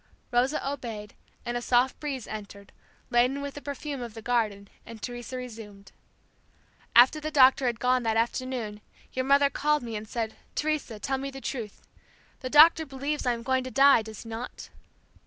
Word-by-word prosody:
Rosa 255 +4 +1
obeyed, 230 -7 -5 0.3
and 240 - -3
a 240 - -1
soft 245 +2 +2
breeze 275 -6 -4
entered, 200 -2 -9 0.4
laden 250 +3 +3
with 280 0 -5
the 290 - -8
perfume 285 -1 -5
of 235 -2 -7
the 225 - -8
garden, 215 -5 0 0.2
and 230 0 -11
Teresa 245 +2 -6
resumed; 215 -5 -9 1.0
"After 255 +6 +7
the 305 0 -4
doctor 265 -3 +5
had 235 -2 -1
gone 250 0 +2
that 225 -1 0
afternoon 230 -2 -2 0.3
your 260 0 -1
mother 280 +1 +4
called 300 -1 +1
me 230 -2 -5
and 215 +1 -6
said, 225 -2 -3 0.2
Teresa, 300 -7 -1
tell 265 +6 -2
me 275 +1 -4
the 270 0 -8
truth. 235 -6 -6 0.6
The 255 - -5
doctor 320 +3 +7
believes 280 0 -3
I 245 - +3
am 230 0 -6
going 260 +1 +1
to 255 - -5
die; 275 -2 +6
does 220 -1 -9
he 230 - -10
not?' 230 +2 -7
250 Hz, 180 wpm, -27 LUFS, 225-275 Hz, 1.0 s, After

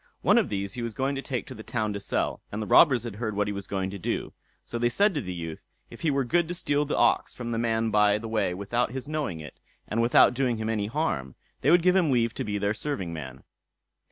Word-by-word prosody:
One - - +5
of - - -1
these 100 -1 -3
he 125 - -5
was 115 -2 -4
to 135 +1 -1
take 130 -3 -3
to - - -8
the 110 - -9
town 110 -2 -2
to 100 - -4
sell, - - -2
and 105 - -4
the 110 - -2
robbers 125 - +6
had 115 -4 -6
heard 110 -2 -3
what 105 0 +1
he 105 - -2
was 100 -1 -5
going 95 -1 -2
to 100 - -7
do, - - -3 0.3
so 120 - -4
they 120 0 +2
said 200 - +3
to 150 - -1
the 90 - -5
youth, 80 -3 -6 0.3
if - - -11
he 165 - +1
were 140 -1 +1
good 170 +6 +1
to 175 - -3
steal 145 -3 0
the 150 - -2
ox 120 - +2
from 120 -1 -5
the 115 - -1
man 115 -1 0
by 105 -1 +4
the 115 +1 -6
way 110 -5 0
without 120 +5 -1
his 130 +1 -5
knowing 150 - -3
it, 75 - -11 0.3
and 115 +2 0
without 120 +1 +5
doing 125 -2 0
him 110 0 -3
any 105 -2 -1
harm, 105 - -2 0.3
they - - +2
would 170 +1 +5
give 180 +1 +4
him 180 -5 +3
leave 115 -3 +2
to - - -3
be 105 -1 -2
their 100 +1 0
serving 100 - -3
man. 65 -5 -8
115 Hz, 270 wpm, -27 LUFS, 100-135 Hz, 0.3 s, robbers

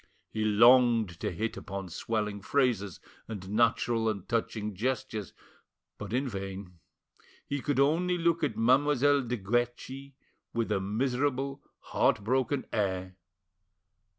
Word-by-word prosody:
He 110 - -2
longed 115 -3 +5
to - - -1
hit 110 +6 -3
upon 95 -1 -6
swelling 105 +2 -2
phrases 115 -7 0 0.3
and 100 -4 -7
natural 115 0 +2
and 100 -4 -4
touching 110 -2 -2
gestures, 120 -1 -3 0.7
but 105 -1 -6
in 130 +4 0
vain. 95 -4 -6 0.7
He 140 -1 -3
could 145 -1 0
only 170 +6 +2
look 170 -1 +1
at 125 -8 0
Mademoiselle 140 +4 +4
de 125 -1 -3
Guerchi 120 +5 -2 0.4
with 115 -2 -1
a 100 - +2
miserable, 130 +6 -1 0.2
heart 105 - +1
broken 130 +4 0
air. 95 -3 -1
115 Hz, 125 wpm, -29 LUFS, 100-130 Hz, 0.7 s, longed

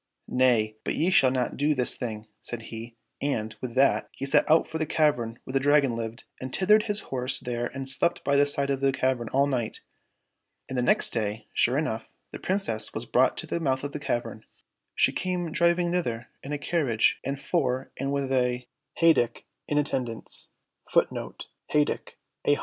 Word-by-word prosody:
— - - -57
" - - -51 0.2
Nay, 110 -4 +3
but - - -2
ye 170 +4 +1
shall 135 -8 +6
not 125 -1 -1
do 150 +2 +2
this 125 -2 +4
thing," 110 -3 -5 0.2
said 120 -2 -6
he, 115 +1 -8 0.2
and, 110 -6 -2
with 125 -2 -5
that, 135 +1 +3
he 135 - -5
set 140 - +3
out 160 +1 +5
for 160 - -4
the 155 - -1
cavern 125 -8 +1
where 130 - -8
the 135 - +3
Dragon 140 -3 +3
lived, 115 +1 -5 0.2
and 130 0 -5
tethered 210 - +4
his 210 +1 +1
horse 130 0 -1
there 120 -2 -3
and 135 0 -6
slept 170 +6 +1
by 140 - +2
the 145 0 +5
side 140 -1 +1
of 135 -1 -1
the 135 0 +3
cavern 130 -3 0
all 140 +1 +3
night. 125 -5 -2 0.9
And 130 - -5
the 125 - +1
next 125 - +3
day, 110 -1 -2
sure 125 +3 +2
enough, 115 -7 -2 0.2
the - - -7
Princess 115 - 0
was 115 - -2
brought 125 +2 +3
to - - -2
the - - -2
mouth 135 -4 0
of 145 - -3
the 150 - -5
cavern. 115 -5 -3 0.5
She - - +4
came 180 -3 -2
driv 170 0 +3
ing 175 -1 0
thither 120 -10 -2
in 140 - -8
a 150 - -1
carriage 140 -7 +1
and 135 +1 -3
four 135 -4 -1
and 135 +1 -2
with 140 -1 -1
a 125 -1 0 0.3
heyduck^ 165 -8 +3 0.2
in 145 - 0
attendance. 125 -6 0
130 Hz, 190 wpm, -27 LUFS, 120-145 Hz, 0.9 s, shall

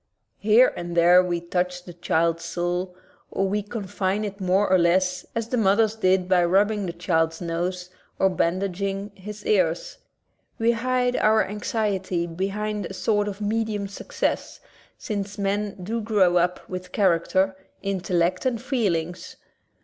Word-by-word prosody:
Here 220 +5 +5
and 175 0 -5
there 175 +2 +7
we 175 -1 -1
touch 180 +1 -2
the 175 - -10
child's 165 0 0
soul, 175 +2 -2 0.3
or 195 - 0
we 205 +2 0
confine 205 -1 -2
it 200 0 -7
more 190 +2 +2
or 185 0 +4
less 180 +2 +2
as 230 0 -2
the 250 - 0
mothers 215 +1 +3
did 185 -3 +2
by 180 -1 +4
rubbing 200 +3 +2
the - - -2
child's 165 -2 0
nose 180 +1 -3 0.3
or 190 - +4
bandaging 195 +2 -1
his 210 +2 -10
ears. - - +1 0.6
We 230 +1 +3
hide 250 +1 0
our 215 0 +3
anxiety 195 -4 -1
behind 200 +3 -3
a 190 - -8
sort 205 +2 +1
of 205 0 -5
medium 210 -1 -1
success, 200 - -3 0.4
since 200 -2 -4
men 200 +1 -1
do 225 +5 -2
grow 205 -5 +3
up 180 +1 0
with 180 0 -7
character, 190 0 +2 0.3
intellect, 185 -2 0
and 240 -3 -1
feelings. 185 - -2
195 Hz, 145 wpm, -24 LUFS, 180-210 Hz, 0.6 s, there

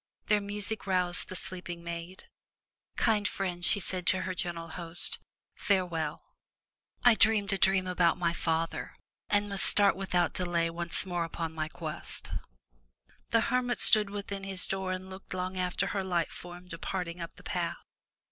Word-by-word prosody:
Their 210 -1 +4
music 205 +1 -1
roused 180 -2 0
the 185 - -6
sleeping 175 -2 -3
maid, 170 +2 -6 0.7
"Kind 210 -2 +2
friend,'' 180 -3 -3
she 205 - +4
said 185 -2 +3
to 185 -1 +3
her 185 - -2
gentle 170 -2 -3
host, 170 -1 -4 0.3
"farewell! 170 -5 -1 0.8
I 245 - +9
dreamed 215 -2 +3
a 195 - -1
dream 190 0 +3
about 180 -2 +2
my 170 -2 +1
father, 165 -1 -2 0.3
and 205 0 +2
must 200 -1 -1
start 205 -1 +5
without 185 -2 0
delay 170 -2 +1
once 170 +3 +1
more 175 -2 -1
upon 165 0 -4
my 155 -1 -2
quest/' - - -7 1.0
The 230 - +4
hermit 245 0 0
stood 210 -2 +8
within 200 -1 -5
his 195 -1 0
door 190 -1 -2
and 185 0 -4
looked 190 0 -8
long 185 +1 -3
after 180 -1 0
her 195 -1 -1
light 175 -3 0
form 175 0 -10
departing 175 0 -4
up 170 - -7
the - - -16
path. - - -2
185 Hz, 160 wpm, -30 LUFS, 170-195 Hz, 1.0 s, I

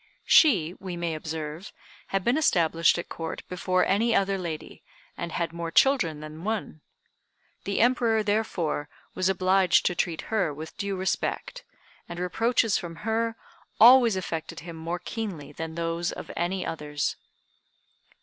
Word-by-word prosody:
She, 185 - +5
we 185 -2 -6
may 170 -1 -2
observe, 155 +2 -5 0.4
had 195 -1 -1
been 240 +5 +2
established 170 - +3
at 175 - -5
Court 165 -1 -6
before 185 0 +1
any 225 +4 +2
other 195 0 +2
lady, 165 -4 -6 0.3
and 170 -1 -5
had 165 -1 -2
more 170 0 -4
children 170 - +3
than 155 +2 -9
one. 205 -7 -3 0.8
The 200 +1 0
Emperor, 235 -2 +3
therefore, 190 -8 -1 0.2
was 185 0 +1
obliged 185 -1 +3
to 180 - +2
treat 170 -2 -1
her 190 -8 +2
with 155 +2 -8
due 200 -1 -3
respect, 190 - -2 0.5
and 170 - -6
reproaches 225 +4 +1
from 170 -3 -7
her 225 0 0 0.4
always 240 -2 +8
affected 170 -4 -4
him 170 0 -8
more 165 +2 -4
keenly 180 -6 -6
than 160 +2 -6
those 170 +1 -1
of - - -8
any 180 +2 -1
others. 150 -2 -2
180 Hz, 145 wpm, -27 LUFS, 165-210 Hz, 0.8 s, always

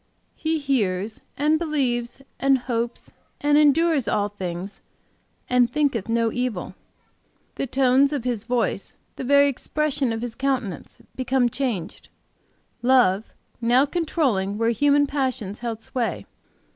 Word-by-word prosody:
He 320 0 -1
hears 220 -8 -1 0.2
and 305 +2 +2
believes 265 -6 -1 0.2
and 275 0 +4
hopes 240 -1 -4 0.3
and 290 0 +2
endures 300 -2 +4
all 205 0 +1
things 190 0 -6 0.7
and 250 -1 +3
thinketh 250 -6 0
no 230 0 +1
evil. 245 -8 -3 0.8
The 275 - -3
tones 265 +2 +3
of 285 -5 -2
his 240 -4 -2
voice, 245 0 -1 0.2
the - - -6
very 280 +2 +5
expression 285 -1 -1
of 225 +1 -3
his 240 -2 -4
countenance, 255 - -3
become 255 -1 +1
changed, 235 -10 -4 0.7
love 240 -5 +4 0.4
now 245 +4 +4
controlling 275 - 0
where 230 +1 +2
human 285 +3 +3
passions 255 -8 -2
held 230 -2 -5
sway. 245 -3 -3
250 Hz, 125 wpm, -23 LUFS, 225-280 Hz, 0.8 s, very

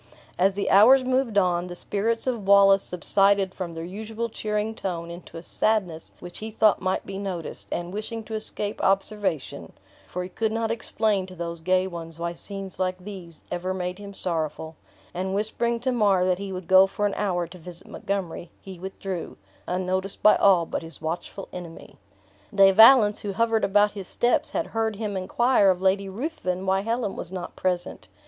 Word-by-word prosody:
As 190 +1 +3
the 200 - -1
hours 250 +7 +7
moved 255 -4 +1
on, 180 -2 +2
the 175 - -7
spirits 225 +5 -1
of 235 -6 -2
Wallace 195 -1 +7
subsided 195 +2 +2
from 175 -3 -6
their 165 - -5
usual 220 +5 -5
cheering 210 0 -2
tone 170 -5 -4
into 170 -1 -10
a 165 - -8
sadness 185 -8 0
which 175 0 -9
he 220 - -5
thought 215 -1 +3
might 185 0 -1
be 195 0 -6
noticed; 185 -5 -5
and 175 +1 -3
wishing 220 +2 -5
to 220 - -9
escape 215 -1 -3
observation 190 - -1 0.3
(for 180 - -4
he 180 - -7
could 220 +4 -1
not 225 0 -1
explain 215 -3 0
to 185 - -11
those 170 -1 -4
gay 185 +2 +2
ones 165 -3 -7
why 170 0 -3
scenes 195 +1 -6
like 185 -1 0
these 180 -4 -10
ever 185 +2 -2
made 180 +1 -4
him 200 -1 -9
sorrowful), 160 -2 -3 0.4
and 190 +2 -2
whispering 235 +3 -1
to 260 +1 0
Mar 200 -6 +3
that 185 0 +1
he 200 -1 -5
would 185 -2 -6
go 190 +1 +7
for 205 +2 -2
an 205 - 0
hour 180 -4 -1
to 175 +2 -13
visit 175 +1 -11
Montgomery, 185 -3 -4
he 190 -2 -10
withdrew, 190 -1 -6 0.3
unnoticed 185 +1 -2
by 210 - +7
all 185 -4 +5
but - - -4
his 165 -3 -9
watchful 170 +4 -5
enemy. 175 -2 -10 0.6
De 195 -1 +7
Valence, 220 0 +7
who 200 -1 -4
hovered 225 +2 +1
about 205 +1 +4
his 195 -3 -7
steps, 240 0 +1
had - - -2
heard 225 -1 -2
him 210 -1 -4
inquire 205 +3 +3
of 185 -1 +2
Lady 195 +1 +1
Ruthven 190 - -3
why 190 0 +2
Helen 230 -1 -2
was 175 - -6
not 180 -2 -6
present! 180 -1 -2
195 Hz, 185 wpm, -25 LUFS, 180-210 Hz, 0.6 s, hours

